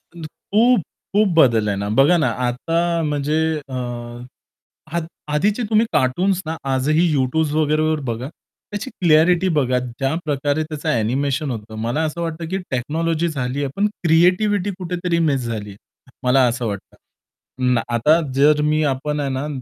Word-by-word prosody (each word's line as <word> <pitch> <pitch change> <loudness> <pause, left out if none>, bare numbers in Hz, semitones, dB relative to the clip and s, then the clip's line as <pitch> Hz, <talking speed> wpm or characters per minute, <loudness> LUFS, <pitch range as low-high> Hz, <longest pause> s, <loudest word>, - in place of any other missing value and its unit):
खूप-खूप 205 +4 0
बदल 115 -8 +4
आहे 100 - -1
ना. 100 +1 -3
बघा 135 +10 +4
ना 155 - +2 0.2
आता 150 +7 -1 0.2
म्हणजे 150 0 -1 0.3
अ, - - -8 1.2
अध 170 -1 -1 0.3
आधीचे 205 +10 +1
तुम्ही 220 +1 +3
कार्टून्स 175 +7 +1
ना 160 +1 -4 0.2
आजही 155 +6 +2
YouTube 145 +3 0
वगैरे 155 0 +1
वर 155 - 0
बघा. 120 +4 -5 0.4
त्याची 205 +5 -4
क्लॅरिटी 170 +2 +3
बघा 130 -4 +2
ज्याप्रकारे 145 +4 -2
त्याचं 155 -1 -5
एनिमेशन 135 +5 0
होतं. 110 -1 -7
मला 115 +7 -1
असं 160 +2 -4
वाटतं 165 0 -4
की 190 - -1
टेक्नॉलॉजी 160 +6 -1
झालीये 140 -1 -2
पण 205 +1 +2 0.2
क्रिएटिव्हिटी 180 +5 +3
कुठेतरी 175 -1 -1
मिस 135 -2 0
झालीये. 105 -3 -5 0.5
मला 130 +1 +4
असं 120 0 -2
वाटतं. 100 -2 -6 0.8
ना 120 - +2
आता 150 +8 +4 0.2
जर 150 +2 +4
मी 155 0 +2
आपण 150 +3 -3
आहे 140 -1 -1
ना 135 +3 -3
150 Hz, 145 wpm, -20 LUFS, 130-170 Hz, 1.2 s, बदल